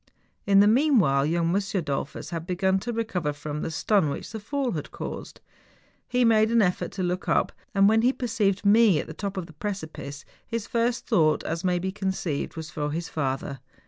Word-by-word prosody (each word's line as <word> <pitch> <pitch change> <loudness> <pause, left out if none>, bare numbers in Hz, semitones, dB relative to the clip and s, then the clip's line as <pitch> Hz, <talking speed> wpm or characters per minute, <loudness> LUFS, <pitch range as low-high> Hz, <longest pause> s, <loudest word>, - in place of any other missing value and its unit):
In 195 -1 +6
tlie 205 - +6
meanwhile, 220 - +3
young 165 +1 +1
M. 200 - +3 0.2
Dollfus 140 -1 -4
had 165 0 -4
begun 190 +1 +1
to 240 +5 -4
recover 205 -9 -1
from 145 +1 -5
the - - -2
stun 160 +1 +2
which 140 - -5
the 220 - -5
fall 260 +4 -2
liad 155 -5 -4
caused. - - -7 0.7
He 250 0 +2
made 220 -1 +4
an 235 0 +3
effort 180 -1 -1
to 190 - -3
look 180 +1 -2
up, - - +2 0.2
and 195 0 +6
when 220 +1 +4
he 245 +2 +4
per¬ 260 - -5
ceived 205 -3 0
me 210 -3 +6
at - - -3
the 160 - -8
top 195 +3 -5
of 185 - -3
the 165 - -14
precipice, 155 -6 -6 0.2
his 230 -2 -3
first 235 +1 0
thought 155 -2 +3
as 165 +1 -3
may 180 -1 +2
be 190 +2 -2
conceived, 190 -6 -3
was 160 0 -7
for 150 -1 -2
his 165 +3 -4
father. 135 -2 -3
190 Hz, 210 wpm, -26 LUFS, 160-220 Hz, 0.7 s, In